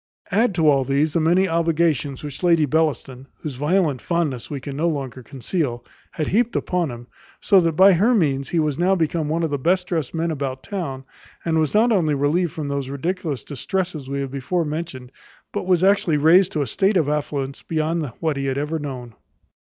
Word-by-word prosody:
Add 215 Hz, +1 st, +2 dB
to 160 Hz, -3 st, +2 dB
all 140 Hz, -2 st, +4 dB
these 140 Hz, +3 st, +1 dB
the 170 Hz, -, +2 dB
many 175 Hz, +4 st, +3 dB
obligations 165 Hz, -5 st, 0 dB
which 145 Hz, -2 st, -7 dB
Lady 170 Hz, -3 st, +4 dB
Bellaston, 140 Hz, -4 st, -1 dB
whose 150 Hz, -, -4 dB
violent 150 Hz, 0 st, +1 dB
fondness 160 Hz, -8 st, -2 dB
we 145 Hz, -, -4 dB
can 140 Hz, +1 st, -7 dB
no 160 Hz, +4 st, 0 dB
longer 135 Hz, -5 st, -4 dB
conceal, 130 Hz, -1 st, -3 dB, 0.3 s
had 155 Hz, -, -2 dB
heaped 235 Hz, +7 st, +1 dB
upon 180 Hz, -4 st, 0 dB
him; 120 Hz, -1 st, -8 dB, 0.3 s
so 195 Hz, -3 st, +4 dB
that 165 Hz, -1 st, +1 dB
by 190 Hz, +5 st, +6 dB
her 215 Hz, +8 st, +3 dB
means 140 Hz, -8 st, +1 dB
he 175 Hz, -, -1 dB
was 155 Hz, -2 st, 0 dB
now 185 Hz, +2 st, +3 dB
become 160 Hz, -2 st, -1 dB
one 165 Hz, +2 st, 0 dB
of 160 Hz, -, -1 dB
the 145 Hz, -, -1 dB
best 180 Hz, +6 st, +1 dB
dressed 165 Hz, -5 st, -3 dB
men 165 Hz, +1 st, -1 dB
about 135 Hz, -3 st, -4 dB
town; 150 Hz, -10 st, -5 dB, 0.4 s
and 160 Hz, -1 st, +1 dB
was 155 Hz, +4 st, 0 dB
not 230 Hz, +3 st, +4 dB
only 165 Hz, -8 st, +2 dB
relieved 150 Hz, +5 st, +1 dB
from 155 Hz, -3 st, -5 dB
those 140 Hz, -2 st, -3 dB
ridiculous 155 Hz, -, -3 dB
distresses 155 Hz, 0 st, -3 dB
we 140 Hz, 0 st, -2 dB
have 135 Hz, -1 st, -4 dB
before 150 Hz, +6 st, -1 dB
mentioned, 150 Hz, -5 st, -5 dB, 0.4 s
but 205 Hz, -3 st, -3 dB
was 180 Hz, -1 st, +3 dB
actually 195 Hz, -5 st, +3 dB
raised 165 Hz, +5 st, +5 dB
to 150 Hz, -, 0 dB
a -, -, -3 dB
state 190 Hz, -, +1 dB
of 160 Hz, -5 st, +2 dB
affluence 145 Hz, -2 st, -2 dB
beyond 160 Hz, 0 st, -1 dB
what 160 Hz, -4 st, -1 dB
he 135 Hz, 0 st, -2 dB
had 135 Hz, 0 st, -1 dB
ever 150 Hz, +3 st, -2 dB
known. 130 Hz, -5 st, -6 dB
155 Hz, 205 wpm, -22 LUFS, 140-175 Hz, 0.4 s, by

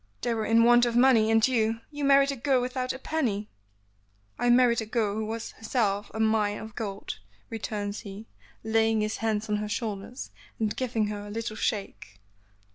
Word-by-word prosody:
"They 240 Hz, -, 0 dB
were 220 Hz, -1 st, -2 dB
in 230 Hz, +1 st, +5 dB
want 240 Hz, +1 st, +6 dB
of 235 Hz, -, -2 dB
money, 240 Hz, -3 st, +5 dB
and 225 Hz, +1 st, +4 dB
you 225 Hz, -2 st, 0 dB
you 290 Hz, -1 st, -5 dB
married 275 Hz, 0 st, +5 dB
a -, -, -3 dB
girl 265 Hz, +1 st, +2 dB
without 255 Hz, +1 st, -2 dB
a -, -, -5 dB
penny." 240 Hz, -9 st, -2 dB, 0.9 s
"I 245 Hz, -, +2 dB
married 240 Hz, -1 st, +5 dB
a -, -, -4 dB
girl 220 Hz, -3 st, 0 dB
who 215 Hz, 0 st, -3 dB
was 225 Hz, +1 st, -5 dB
in -, -, -24 dB
herself 210 Hz, -3 st, 0 dB
a 220 Hz, -, -6 dB
mine 215 Hz, -2 st, +2 dB
of 220 Hz, 0 st, -9 dB
gold," 200 Hz, -, -5 dB, 0.3 s
returns 210 Hz, -2 st, -4 dB
he, 205 Hz, 0 st, -9 dB, 0.4 s
laying 220 Hz, 0 st, +2 dB
his 215 Hz, 0 st, -2 dB
hands 220 Hz, -1 st, -1 dB
on 210 Hz, 0 st, 0 dB
her 210 Hz, 0 st, -4 dB
shoulders 215 Hz, +2 st, -4 dB, 0.3 s
and 215 Hz, -2 st, 0 dB
giving 235 Hz, -4 st, -1 dB
her 205 Hz, 0 st, -5 dB
a -, -, -8 dB
little 220 Hz, +1 st, -4 dB
shake. 210 Hz, -2 st, -4 dB
225 Hz, 195 wpm, -27 LUFS, 210-240 Hz, 0.9 s, want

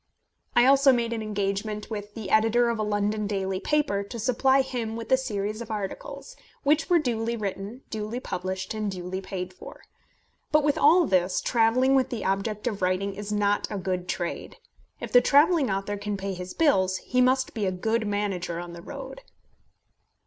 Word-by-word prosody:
I 240 Hz, -, +6 dB
also 275 Hz, +1 st, +6 dB
made 235 Hz, -2 st, 0 dB
an 225 Hz, -, -3 dB
engagement 210 Hz, +1 st, -3 dB
with 205 Hz, -1 st, -6 dB
the 210 Hz, -4 st, -6 dB
editor 225 Hz, +2 st, +4 dB
of 230 Hz, -1 st, -2 dB
a -, -, +1 dB
London 210 Hz, 0 st, 0 dB
daily 195 Hz, -2 st, -2 dB
paper 290 Hz, -7 st, +1 dB
to 200 Hz, +4 st, -7 dB
supply 265 Hz, +3 st, +3 dB
him 235 Hz, -4 st, -4 dB
with 230 Hz, +1 st, -7 dB
a -, -, +8 dB
series 215 Hz, -4 st, -3 dB
of 235 Hz, -, -7 dB
articles, 215 Hz, -, -6 dB, 0.3 s
which 300 Hz, +5 st, +2 dB
were 350 Hz, -, +5 dB
duly 235 Hz, -5 st, -1 dB
written, 200 Hz, +4 st, -5 dB
duly 220 Hz, +2 st, -3 dB
published, 185 Hz, -4 st, -4 dB
and 215 Hz, -1 st, -2 dB
duly 185 Hz, 0 st, -5 dB
paid 185 Hz, -1 st, -5 dB
for. 180 Hz, -, -12 dB, 0.7 s
But 305 Hz, 0 st, +4 dB
with 290 Hz, -1 st, +2 dB
all 335 Hz, +4 st, +6 dB
this, 185 Hz, -4 st, +2 dB
travelling 245 Hz, +3 st, +3 dB
with 265 Hz, -1 st, +3 dB
the 240 Hz, -4 st, -4 dB
object 195 Hz, +3 st, -1 dB
of 215 Hz, -5 st, -2 dB
writing 185 Hz, +2 st, 0 dB
is 205 Hz, +1 st, -6 dB
not 205 Hz, -1 st, +1 dB
a 205 Hz, -, -3 dB
good 180 Hz, -1 st, -3 dB
trade. 175 Hz, -1 st, -4 dB, 0.4 s
If -, -, -6 dB
the 245 Hz, -, +7 dB
travelling 290 Hz, +2 st, +4 dB
author 195 Hz, +1 st, -2 dB
can 205 Hz, 0 st, -3 dB
pay 195 Hz, 0 st, -3 dB
his 180 Hz, 0 st, -7 dB
bills, 190 Hz, -, +3 dB
he 250 Hz, +5 st, 0 dB
must 260 Hz, +1 st, +2 dB
be 210 Hz, -4 st, -1 dB
a -, -, +1 dB
good 220 Hz, +4 st, -1 dB
manager 195 Hz, -4 st, -2 dB
on 175 Hz, 0 st, -7 dB
the 170 Hz, -, -9 dB
road. -, -, -8 dB
210 Hz, 185 wpm, -26 LUFS, 195-245 Hz, 0.7 s, a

